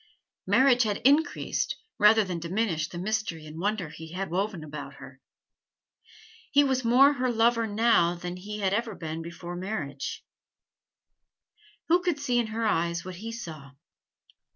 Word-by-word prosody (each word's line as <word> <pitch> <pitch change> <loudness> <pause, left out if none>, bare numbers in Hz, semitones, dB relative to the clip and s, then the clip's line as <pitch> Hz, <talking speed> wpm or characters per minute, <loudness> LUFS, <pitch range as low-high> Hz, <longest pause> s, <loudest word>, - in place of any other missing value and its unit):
Marriage 260 -2 +5
had 210 -3 +1
increased 290 +4 +2 0.2
rather 210 +1 +6
than 180 -3 -4
diminished 170 -1 -1
the 175 - -7
mystery 190 -4 -2
and 155 +1 -9
wonder 200 -3 -1
he 160 +2 -10
had 190 -1 -4
woven 190 -2 -2
about 150 -1 -8
her. - - -13 1.3
He 285 0 +6
was 265 -2 0
more 260 +5 +6
her 255 -2 0
lover 230 0 +2
now 210 -5 +3
than 175 +1 -6
he 210 +3 -7
had 195 -1 +1 0.2
been 160 0 -5
before 170 +1 -8
his 175 - -6
marriage. 150 -9 -4 1.7
Who 350 +2 +5
could 350 -5 -1
see 250 -4 +1
in 235 - 0
her 225 +1 -2
eyes 170 -4 0
what 185 -1 -7
he 225 +4 -6
saw? 155 - -8
205 Hz, 150 wpm, -27 LUFS, 170-230 Hz, 1.7 s, rather